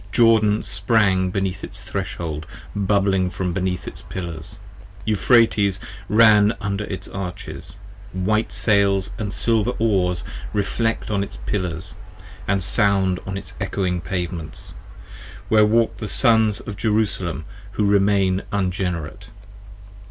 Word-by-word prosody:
Jordan 110 Hz, -2 st, +4 dB
sprang 95 Hz, -5 st, +3 dB
beneath 95 Hz, 0 st, -2 dB
its 100 Hz, -, -7 dB
threshold 85 Hz, -7 st, -4 dB, 0.3 s
bubbling 100 Hz, -2 st, +2 dB
from 90 Hz, 0 st, -3 dB
beneath 90 Hz, 0 st, -2 dB
Its -, -, -7 dB
pillars: 85 Hz, -4 st, -7 dB, 0.5 s
Euphrates 105 Hz, -3 st, +3 dB, 0.3 s
ran 105 Hz, 0 st, +5 dB
under 100 Hz, 0 st, -2 dB
its 95 Hz, -, -6 dB
arches: 90 Hz, -1 st, -7 dB, 0.4 s
white 105 Hz, +4 st, 0 dB
sails 100 Hz, -3 st, +2 dB
25 -, -, -6 dB
And 105 Hz, -2 st, -2 dB
silver 115 Hz, +3 st, +1 dB
oars 90 Hz, -, +1 dB, 0.3 s
reflect 110 Hz, +2 st, -1 dB
on 100 Hz, -1 st, +1 dB
its -, -, -8 dB
pillars, 90 Hz, -5 st, -3 dB, 0.4 s
& 100 Hz, -, -2 dB
sound 95 Hz, -2 st, +2 dB
on 95 Hz, 0 st, -3 dB
its -, -, -9 dB
ecchoing 90 Hz, -3 st, -1 dB
Pavements: 85 Hz, -3 st, -5 dB, 0.8 s
where 105 Hz, -1 st, +5 dB
walk 110 Hz, 0 st, +2 dB
the 110 Hz, -, -5 dB
Sons 110 Hz, -3 st, +3 dB
of 100 Hz, -, -7 dB
Jerusalem 100 Hz, -7 st, -1 dB, 0.3 s
who 105 Hz, -, +1 dB
remain 100 Hz, -2 st, +3 dB
Ungenerate. 90 Hz, -5 st, -2 dB
100 Hz, 120 wpm, -22 LUFS, 90-105 Hz, 0.8 s, ran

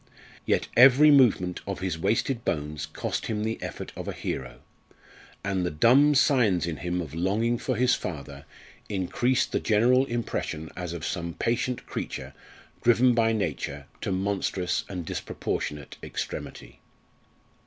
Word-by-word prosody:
Yet -, -, +1 dB
every 135 Hz, +4 st, +8 dB
movement 110 Hz, -10 st, +4 dB
of 100 Hz, -2 st, -3 dB
his 90 Hz, -4 st, -2 dB
wasted 115 Hz, +6 st, 0 dB
bones 75 Hz, -1 st, -2 dB
cost 80 Hz, -, -4 dB
him 105 Hz, -1 st, -2 dB
the 110 Hz, +1 st, -3 dB
effort -, -, -6 dB
of -, -, -7 dB
a -, -, -3 dB
hero, 65 Hz, -, -5 dB, 0.8 s
and 95 Hz, -2 st, -1 dB
the 90 Hz, -, 0 dB
dumb 130 Hz, -, +5 dB
signs 120 Hz, -, +3 dB
in 85 Hz, -2 st, -3 dB
him 90 Hz, 0 st, -2 dB
of 80 Hz, -4 st, -7 dB
longing 105 Hz, +8 st, 0 dB
for -, -, -1 dB
his 125 Hz, 0 st, +3 dB
father 70 Hz, -3 st, -5 dB, 0.4 s
increased 105 Hz, +6 st, 0 dB
the -, -, +1 dB
general 125 Hz, +5 st, +3 dB
impression 115 Hz, -9 st, -3 dB
as 90 Hz, -2 st, -5 dB
of 85 Hz, -2 st, -5 dB
some 85 Hz, -2 st, -3 dB
patient 120 Hz, +2 st, -1 dB
creature -, -, -5 dB, 0.5 s
driven 120 Hz, +1 st, +5 dB
by 115 Hz, -1 st, +3 dB
Nature 75 Hz, -9 st, -3 dB, 0.2 s
to -, -, -2 dB
monstrous 95 Hz, -2 st, -1 dB
and 90 Hz, -4 st, -5 dB
disproportionate 75 Hz, -1 st, -4 dB
extremity. -, -, -6 dB
100 Hz, 145 wpm, -27 LUFS, 85-120 Hz, 0.8 s, every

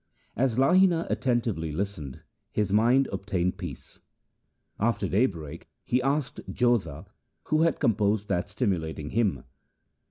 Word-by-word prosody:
1 125 Hz, -, -1 dB
As 125 Hz, -4 st, +1 dB
Lahina 170 Hz, +5 st, +4 dB
attentively 115 Hz, -, 0 dB
listened, 80 Hz, -5 st, -5 dB, 0.3 s
his 105 Hz, -2 st, 0 dB
mind 120 Hz, +6 st, +4 dB
obtained 95 Hz, -2 st, -2 dB
peace. -, -, -8 dB, 0.8 s
After 105 Hz, -2 st, +1 dB
daybreak 85 Hz, -, -1 dB
he 125 Hz, +1 st, +1 dB
asked 140 Hz, +2 st, -1 dB
Jodha 120 Hz, -, 0 dB, 0.4 s
who 155 Hz, 0 st, +1 dB
had 165 Hz, -2 st, +2 dB
composed 105 Hz, -1 st, +1 dB
that 90 Hz, 0 st, -1 dB
stimulating 85 Hz, -, -2 dB
hymn. 100 Hz, -, 0 dB
105 Hz, 120 wpm, -27 LUFS, 90-125 Hz, 0.8 s, Lahina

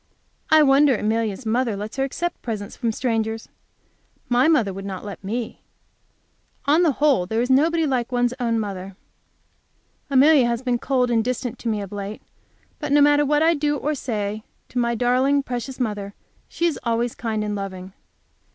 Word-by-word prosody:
I 315 Hz, -1 st, +6 dB
wonder 275 Hz, -1 st, +5 dB
Amelia's 220 Hz, +1 st, -1 dB
mother 230 Hz, 0 st, 0 dB
lets 210 Hz, +5 st, -6 dB
her 270 Hz, -, +1 dB
accept 345 Hz, +6 st, -3 dB
presents 215 Hz, -3 st, -5 dB
from 235 Hz, -3 st, -1 dB
strangers. 225 Hz, -2 st, -2 dB, 0.8 s
My 250 Hz, +3 st, +4 dB
mother 235 Hz, -12 st, +3 dB
would 195 Hz, +1 st, -7 dB
not 195 Hz, 0 st, -6 dB
let 200 Hz, -2 st, -8 dB
me. 225 Hz, +4 st, -4 dB, 1.0 s
On 300 Hz, +4 st, +4 dB
the 325 Hz, -5 st, +3 dB
whole, 270 Hz, -11 st, +2 dB
there 220 Hz, +3 st, -1 dB
is 250 Hz, -, -1 dB
nobody 325 Hz, +5 st, +3 dB
like 255 Hz, -3 st, -1 dB
one's 245 Hz, 0 st, +1 dB
own 230 Hz, -2 st, 0 dB
mother. 195 Hz, -2 st, -5 dB, 1.1 s
Amelia 275 Hz, -1 st, +5 dB
has 235 Hz, +1 st, -2 dB
been 245 Hz, -2 st, 0 dB
cold 250 Hz, -2 st, +1 dB
and 225 Hz, -1 st, +2 dB
distant 250 Hz, 0 st, -3 dB
to -, -, -6 dB
me 215 Hz, -2 st, -1 dB
of 200 Hz, -, -7 dB
late, 205 Hz, +1 st, -6 dB, 0.6 s
but 295 Hz, -3 st, -4 dB
no 290 Hz, -, +5 dB
matter 290 Hz, 0 st, +5 dB
what 295 Hz, +2 st, +2 dB
I 330 Hz, +1 st, +5 dB
do 295 Hz, -1 st, 0 dB
or 300 Hz, +3 st, -1 dB
say 215 Hz, -6 st, -3 dB, 0.3 s
to 250 Hz, -, -2 dB
my 235 Hz, 0 st, +1 dB
darling, 255 Hz, +4 st, +2 dB
precious 255 Hz, +1 st, -5 dB
mother, 205 Hz, -4 st, -3 dB, 0.3 s
she 340 Hz, -, -2 dB
is 335 Hz, -4 st, 0 dB
always 235 Hz, 0 st, 0 dB
kind 220 Hz, -2 st, -3 dB
and 210 Hz, 0 st, -2 dB
loving. 190 Hz, -2 st, -6 dB
240 Hz, 180 wpm, -22 LUFS, 215-275 Hz, 1.1 s, I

